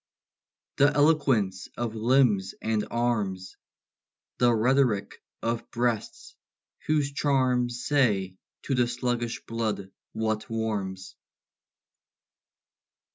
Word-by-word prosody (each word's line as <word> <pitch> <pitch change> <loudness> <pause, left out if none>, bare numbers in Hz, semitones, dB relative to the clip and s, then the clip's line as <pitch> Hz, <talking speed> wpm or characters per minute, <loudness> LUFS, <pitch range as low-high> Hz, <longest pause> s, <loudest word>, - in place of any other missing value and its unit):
The 145 +1 +5
eloquence 135 -11 +2
of 120 -2 -2
limbs 110 -4 +2
and 110 -1 -1
arms! 105 -6 -1 0.8
The 120 -1 +5
rhetoric 115 -3 +1 0.2
of 115 0 -2
breasts, 120 -2 -2 0.5
whose 150 -2 +1
charms 125 -4 +1
Say 105 -10 +1 0.3
to - - -2
the 125 -2 +2
sluggish 120 -1 -2
blood 110 -4 -3 0.2
what 110 -1 -2
warms! 100 -5 -3
115 Hz, 85 wpm, -27 LUFS, 105-125 Hz, 0.8 s, The